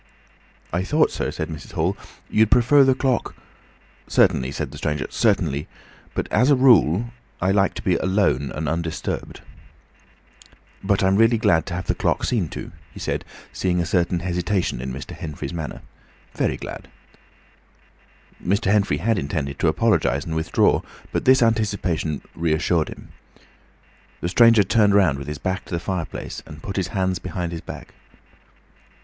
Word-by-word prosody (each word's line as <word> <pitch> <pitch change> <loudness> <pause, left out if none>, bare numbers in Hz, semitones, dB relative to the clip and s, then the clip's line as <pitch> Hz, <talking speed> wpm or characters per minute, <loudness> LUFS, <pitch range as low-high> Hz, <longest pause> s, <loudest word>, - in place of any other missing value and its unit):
"I 90 +2 0
thought, 150 +10 +2
sir," - - -2
said - - -4
Mrs. 80 -2 -9
Hall, - - 0 0.3
"you'd 110 0 +3
prefer 125 +4 +5
the 130 -1 +4
clock—" 130 -2 -1 0.7
"Certainly," 65 +1 +3
said - - -4
the - - -9
stranger, 75 -4 -1
"certainly—but, 70 +2 -2
as 125 +6 +3
a 145 - +6
rule, 120 - +4 0.3
I 95 +2 +1
like 100 0 +2
to - - -6
be 90 -3 +2
alone 95 - +1
and 80 0 -3
undisturbed. 80 +1 -3 1.4
"But 100 0 +1
I'm 95 +1 +3
really 115 +1 +4
glad 100 -8 +2
to 90 - -4
have 90 - -4
the - - +1
clock - - 0
seen 100 -10 0
to," - - -7 0.2
he - - -11
said, - - -2 0.3
seeing 90 -1 0
a 85 - 0
certain 85 0 0
hesitation 90 -4 -1
in 65 0 -4
Mr. 65 +1 -7
Henfrey's 75 +1 -6
manner. 80 -6 -6 0.5
"Very - - 0
glad." - - -8 1.6
Mr. 100 +1 +1
Henfrey 100 -8 +2
had 105 +5 +1
intended 70 -2 -3
to - - +2
apologise 80 -5 +2
and 80 - -4
withdraw, 80 0 +2 0.3
but - - -2
this 130 -1 +6
anticipation 100 -9 0
reassured 80 0 +1
him. - - -11 1.1
The 85 - -2
stranger 115 +2 +6
turned 100 +1 +3
round 85 -9 +3
with 70 - -8
his 75 0 -4
back 95 +4 -3
to - - -15
the - - -1
fireplace 85 -1 -5
and 75 -2 -11
put 100 - -5
his 95 -2 0
hands 95 -2 -1
behind 90 -1 -4
his 85 -1 -5
back. - - -10
90 Hz, 160 wpm, -22 LUFS, 80-105 Hz, 1.6 s, a